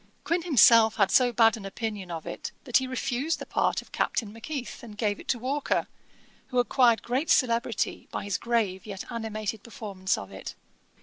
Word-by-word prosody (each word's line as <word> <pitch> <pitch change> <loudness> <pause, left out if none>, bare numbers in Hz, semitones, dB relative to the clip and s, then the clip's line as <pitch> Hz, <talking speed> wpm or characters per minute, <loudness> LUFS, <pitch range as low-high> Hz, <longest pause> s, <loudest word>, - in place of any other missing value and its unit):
Quin 335 +3 0
himself 230 -8 +6
had 195 -2 +3
so 250 -1 +5
bad 225 -2 +5
an 220 - -9
opinion 205 -1 -5
of 165 -2 -5
it, - - -6
that 250 -3 +3
he 260 0 -1
refused 255 +4 -1
the - - -7
part - - 0
of - - -23
Captain 215 -3 -1
Macheath, 250 +3 -6
and 215 -3 -11
gave 210 -2 0
it - - -12
to 245 - +1
Walker, 270 +4 -1 0.6
who 250 - -4
acquired 245 -2 +4
great 260 +7 -1
celebrity 235 -3 +1
by - - -4
his 200 0 -2
grave 220 -5 -1
yet 195 -2 -6
animated 220 -2 -4
performance 200 -5 -3
of 100 0 -8
it. 95 - -8
230 Hz, 185 wpm, -27 LUFS, 205-250 Hz, 0.6 s, himself